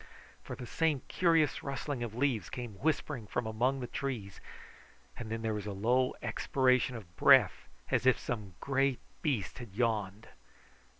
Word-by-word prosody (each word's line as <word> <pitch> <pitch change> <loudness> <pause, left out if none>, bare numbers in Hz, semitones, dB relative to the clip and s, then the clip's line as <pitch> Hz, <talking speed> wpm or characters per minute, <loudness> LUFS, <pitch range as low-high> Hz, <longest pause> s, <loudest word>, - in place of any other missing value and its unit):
For - - -7
the 125 - -8
same 150 +1 0
curious 165 -5 +3
rustling 140 -1 -4
of 115 -2 -4
leaves 125 -7 0
came 120 -2 -5
whispering 145 -6 -1
from 125 +2 -2
among 125 +5 0
the - - -2
trees, 120 -7 -4 0.7
and 115 -2 -7
then 115 0 -3
there 110 -1 0
was 105 -1 -4
a 105 - -3
low 125 +6 +2
expiration 130 -1 +2
of 90 -6 -10
breath, - - +5 0.2
as 130 - +2
if 130 - +6
some 105 -7 -5
great 135 -1 +1 0.2
beast 130 - -1
had 120 -6 -9
yawned. 110 -3 -1
125 Hz, 160 wpm, -32 LUFS, 110-135 Hz, 0.7 s, if